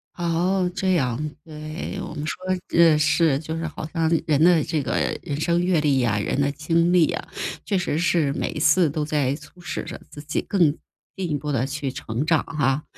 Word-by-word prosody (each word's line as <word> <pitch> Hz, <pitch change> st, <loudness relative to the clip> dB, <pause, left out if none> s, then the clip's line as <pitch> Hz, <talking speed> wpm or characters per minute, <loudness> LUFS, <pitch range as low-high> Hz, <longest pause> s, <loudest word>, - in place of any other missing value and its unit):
哦， 180 Hz, +2 st, +1 dB
这 190 Hz, -1 st, +1 dB
样， 140 Hz, -1 st, 0 dB
对。 155 Hz, +4 st, -6 dB
我 -, -, -6 dB
们 150 Hz, -, -4 dB
说 155 Hz, -, -2 dB, 0.4 s
呃， 165 Hz, -3 st, +6 dB
是 150 Hz, -1 st, +3 dB
就 160 Hz, +1 st, -5 dB
是 165 Hz, 0 st, -3 dB
好 155 Hz, 0 st, -6 dB
像 165 Hz, -2 st, +1 dB, 0.2 s
人 155 Hz, 0 st, +3 dB
的 175 Hz, -3 st, +5 dB
这 155 Hz, -1 st, -1 dB
个 -, -, -3 dB, 0.3 s
人 150 Hz, -5 st, -4 dB
生 170 Hz, +2 st, +1 dB
阅 180 Hz, -2 st, +2 dB
历 140 Hz, -3 st, +2 dB
啊、 110 Hz, -4 st, +1 dB
人 105 Hz, -, -1 dB
的 140 Hz, 0 st, +2 dB
经 165 Hz, +4 st, +1 dB
历 175 Hz, -3 st, +4 dB
啊， -, -, -5 dB, 0.4 s
确 200 Hz, -, 0 dB
实 175 Hz, -4 st, -1 dB
是 165 Hz, -5 st, +2 dB
每 -, -, -2 dB
一 -, -, -5 dB
次 155 Hz, +3 st, +4 dB
都 150 Hz, +1 st, -2 dB
在 145 Hz, -3 st, 0 dB
促 175 Hz, +3 st, -15 dB
使 160 Hz, -, -4 dB
着 -, -, -8 dB
自 145 Hz, -, -10 dB
己 150 Hz, -, -1 dB
更 200 Hz, -, -3 dB, 0.6 s
进 190 Hz, -3 st, -3 dB
一 -, -, +1 dB
步 145 Hz, +1 st, -3 dB
地 130 Hz, -2 st, +1 dB
去 140 Hz, -1 st, -3 dB
成 120 Hz, +3 st, -3 dB
长 160 Hz, -1 st, +2 dB
哈， 145 Hz, -2 st, 0 dB
155 Hz, 225 characters per minute, -23 LUFS, 145-170 Hz, 0.6 s, 呃